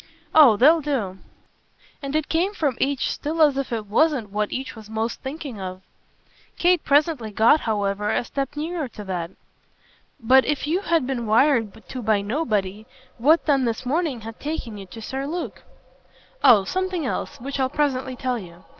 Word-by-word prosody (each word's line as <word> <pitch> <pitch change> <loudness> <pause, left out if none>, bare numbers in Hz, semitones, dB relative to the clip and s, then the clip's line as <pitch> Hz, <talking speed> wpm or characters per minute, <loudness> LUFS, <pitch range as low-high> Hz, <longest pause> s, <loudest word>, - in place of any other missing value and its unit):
"Oh 275 -9 +7
they'll 315 +7 +6
do." 230 -11 -2 0.8
And 275 +1 -4
it 310 -1 0
came 365 +6 0
from 290 -8 0
each 275 -1 0
still 315 +3 -4
as 290 -3 +4
if 275 -2 -3
it 225 -2 -2
wasn't 235 0 +1
what 210 0 -1
each 260 -1 -4
was 215 -1 -12
most 220 +1 -3
thinking 270 -6 -6
of. 185 0 -6 0.7
Kate 355 -1 +3
presently 285 -5 +2
got 225 +8 +4
however 205 -1 -1
a - - +1
step 275 +2 -4
nearer 320 -1 -3
to 215 -3 -10
that. 180 -4 -4 0.9
"But 260 +2 +5
if 295 -1 -1
you 325 +5 +1
had 335 -8 +1
been 245 -3 -3
wired 225 -2 +2
to 255 - -6
by 215 -2 +2
nobody 215 -4 -2 0.3
what 310 +8 +4
then 275 -4 +2
this 230 +2 -2
morning 290 -2 -1
had 225 +1 -9
taken 285 -7 -4
you 195 - -9
to 225 +4 -10
Sir 270 +4 -4
Luke?" 345 +3 -5 0.8
"Oh 235 -7 +7
something 370 - -2
else - - -4
which 275 +3 -5
I'll 260 -1 +1
presently 260 -3 -1
tell 250 -2 -2
you. 175 -2 -12
260 Hz, 175 wpm, -23 LUFS, 220-300 Hz, 0.9 s, Oh